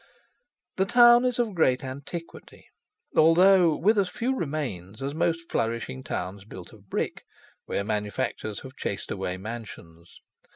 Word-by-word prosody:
The 190 - +3
town 240 +2 +7
is 250 -1 0
of 235 -4 0
great 130 -7 +2
antiquity, 140 +6 -8 0.5
although 175 +1 +6
with 210 +4 +3
as 190 -2 +1
few 255 +3 -1
remains 135 - -4
as 140 +1 -3
most 165 +1 -1
flourishing 115 +3 -2
towns 95 -1 -5
built 95 -2 -11
of 100 -3 -18
brick, - - -3 0.4
where 100 - -1
manufactures 105 0 -3
have 130 0 -11
chased - - -4
away 90 0 -3
mansions. 95 -6 -9
135 Hz, 135 wpm, -26 LUFS, -, 0.5 s, town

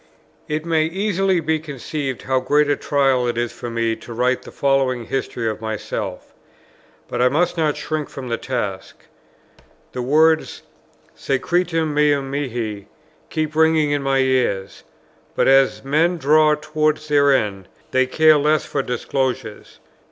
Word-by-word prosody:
It 155 +1 -3
may 160 -2 +2
easily 195 0 0
be 160 0 0
conceived 145 -2 -5
how 130 -1 +1
great 145 +3 +2
a 145 - +2
trial 135 -4 +1
it 120 -1 -2
is 120 -1 -2
to 120 - -5
me 115 -1 -1
to 120 - -10
write 125 +2 +1
the - - -12
following 135 -3 0
history 120 -2 -3
of 110 0 -3
myself; 110 -1 -5 0.7
but 120 - -3
I 125 - +5
must 175 +6 +1
not 155 -3 0
shrink 155 -2 -3
from 135 -2 -8
the 115 -1 -1
task. 105 -7 -5 0.9
The 125 - -4
words, 155 +5 +2 0.5
"Secretum 165 +3 -1
meum 145 -2 +1
mihi," 115 -7 -4 0.4
keep 155 -1 -2
ringing 160 -2 +3
in 145 -1 0
my 135 0 +1
ears; 130 -7 0 0.5
but - - +2
as 135 0 +4
men 160 +6 +1
draw 155 +1 +4
towards 155 0 -1
their 145 -1 +4
end, 100 -7 0 0.2
they 130 0 +2
care 155 +3 +5
less 150 0 +1
for - - -2
disclosures. 125 -2 -3
140 Hz, 150 wpm, -20 LUFS, 125-155 Hz, 0.9 s, I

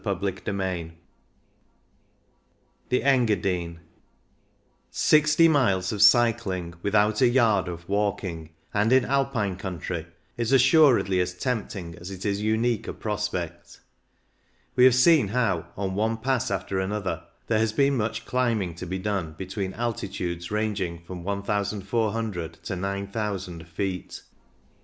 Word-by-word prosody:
CHAPTER 100 -2 -1
XIII 95 -5 -2 2.0
THE 125 - +1
ENGADINE 95 -10 +1 1.1
Sixty 155 +2 +4
miles 100 - +2
of 105 -2 -2
cycling 110 -9 +3
without 105 +2 +2
a 125 - +6
yard 115 -7 +3
of 85 -1 -7
walking, 100 -5 -2 0.2
and 105 +3 +2
in 130 -1 +5
Alpine 130 -8 0
country, 90 -2 -5 0.3
is 120 +1 -1
assur 135 +1 +6
edly 95 -2 +1
as 90 0 -2
tempting 100 -7 -3
as 85 +2 -8
it 95 0 -7
is 100 0 0
unique 110 +2 0
a - - -4
prospect 100 -6 -4 0.9
We 125 - +6
have 130 -2 +6
seen 135 -2 +5
how, 100 -6 0
on 95 -1 -2
one 110 +3 0
pass 130 +2 0
after 95 -1 -2
another, 95 -4 -2 0.2
there 110 -2 +1
has 110 -1 +1
been 140 +4 +2
much 110 -1 -2
climbing 115 -8 0
to 90 - -6
be 95 +2 -3
done 95 -5 -2
between 95 +1 -4
altitudes 95 -7 -3
ranging 100 -6 -2
from 90 0 -8
1,400 100 -1 -2
to 95 - -3
9,000 100 -2 -4
feet. 90 +2 -4
100 Hz, 130 wpm, -26 LUFS, 95-115 Hz, 2.0 s, a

